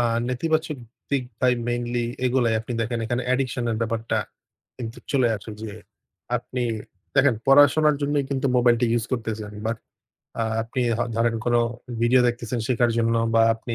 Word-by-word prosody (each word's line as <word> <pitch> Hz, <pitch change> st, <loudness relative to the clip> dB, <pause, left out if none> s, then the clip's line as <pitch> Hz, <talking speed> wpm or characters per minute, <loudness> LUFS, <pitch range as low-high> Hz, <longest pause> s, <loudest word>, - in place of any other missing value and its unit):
আ -, -, +3 dB, 0.3 s
নেতিবাচক 155 Hz, +4 st, 0 dB, 0.3 s
দিক 135 Hz, -3 st, +1 dB, 0.2 s
ভাই 125 Hz, -1 st, +4 dB, 0.2 s
মেইনলি 120 Hz, 0 st, -1 dB, 0.2 s
এগুলাই। 120 Hz, -3 st, +2 dB
আপনি 115 Hz, -, -6 dB
দেখেন 115 Hz, +1 st, -1 dB
এখানে 120 Hz, +2 st, -1 dB
অ্যাডিকশন 130 Hz, -1 st, 0 dB
এর 110 Hz, -, -1 dB
ব্যাপারটা 115 Hz, 0 st, -1 dB, 0.6 s
কিন্তু 115 Hz, -2 st, -6 dB
চলে 130 Hz, -3 st, +3 dB
আসে 110 Hz, -, -10 dB
যে, 110 Hz, -, -5 dB, 0.7 s
আপনি 125 Hz, +1 st, -4 dB, 0.5 s
দেখেন 135 Hz, -3 st, +5 dB
পড়াশোনার 145 Hz, +2 st, +6 dB
জন্যই 145 Hz, -1 st, +1 dB
কিন্তু 135 Hz, 0 st, 0 dB
মোবাইল 120 Hz, -1 st, +5 dB
টা 120 Hz, -, +3 dB
use 115 Hz, -, -5 dB
করতেছেন। 110 Hz, -3 st, -3 dB
বাট, 115 Hz, 0 st, -1 dB, 0.6 s
আ -, -, +2 dB, 0.2 s
আপনি 120 Hz, +3 st, -4 dB, 0.2 s
হ -, -, -1 dB, 0.2 s
ধরেন 115 Hz, 0 st, +2 dB
কোন 120 Hz, 0 st, +1 dB, 0.5 s
ভিডিও 125 Hz, +2 st, +5 dB
দেখতেছেন 120 Hz, 0 st, -3 dB
শেখার 120 Hz, -1 st, +2 dB
জন্য 115 Hz, 0 st, +2 dB, 0.2 s
বা 115 Hz, -, +6 dB
আপনি 115 Hz, +1 st, -5 dB
120 Hz, 160 wpm, -24 LUFS, 115-130 Hz, 0.7 s, পড়াশোনার